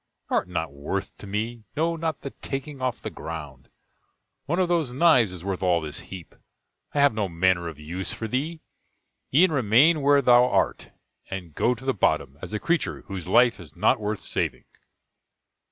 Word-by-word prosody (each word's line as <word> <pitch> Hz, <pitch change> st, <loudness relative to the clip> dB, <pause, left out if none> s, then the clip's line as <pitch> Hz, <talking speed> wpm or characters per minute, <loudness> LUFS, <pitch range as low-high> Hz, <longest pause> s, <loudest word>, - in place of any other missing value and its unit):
Thou -, -, +3 dB
art -, -, -1 dB
not 80 Hz, -3 st, -2 dB
worth 95 Hz, +8 st, -4 dB
to 100 Hz, -, -10 dB
me 110 Hz, +3 st, -3 dB
no, 165 Hz, +2 st, +1 dB
not 160 Hz, -2 st, -3 dB
the 140 Hz, -, -6 dB
taking 135 Hz, 0 st, -6 dB
off 125 Hz, -2 st, -1 dB
the -, -, -4 dB
ground; 75 Hz, -5 st, -8 dB, 0.8 s
one 170 Hz, +4 st, 0 dB
of 185 Hz, -1 st, +2 dB
those 165 Hz, -7 st, +1 dB
knives 130 Hz, -, +4 dB
is 90 Hz, -1 st, -9 dB
worth 95 Hz, -2 st, -2 dB
all 90 Hz, -2 st, +3 dB
this 75 Hz, -2 st, -5 dB
heap; 90 Hz, -4 st, -10 dB, 0.6 s
I -, -, +2 dB
have 140 Hz, -3 st, +5 dB
no 105 Hz, -3 st, -1 dB
manner 85 Hz, 0 st, +1 dB
of 80 Hz, -3 st, -7 dB
use 85 Hz, +5 st, -4 dB
for 110 Hz, -, -4 dB
thee 150 Hz, +8 st, -2 dB, 0.7 s
e'en 165 Hz, +6 st, +5 dB
remain 140 Hz, +5 st, +4 dB
where 140 Hz, 0 st, +4 dB
thou 125 Hz, 0 st, +6 dB
art, -, -, 0 dB, 0.4 s
and 90 Hz, -5 st, -6 dB
go 125 Hz, +11 st, +1 dB
to 125 Hz, +3 st, -12 dB
the 135 Hz, -, +2 dB
bottom, 70 Hz, -, 0 dB
as 95 Hz, -, -7 dB
a 105 Hz, -, -2 dB
creature 170 Hz, +1 st, -1 dB
whose 95 Hz, -3 st, -7 dB
life 120 Hz, +4 st, +4 dB
is 85 Hz, -5 st, -12 dB
not -, -, +3 dB
worth 105 Hz, -1 st, -3 dB
saving." -, -, -2 dB
110 Hz, 185 wpm, -25 LUFS, 90-140 Hz, 0.8 s, thou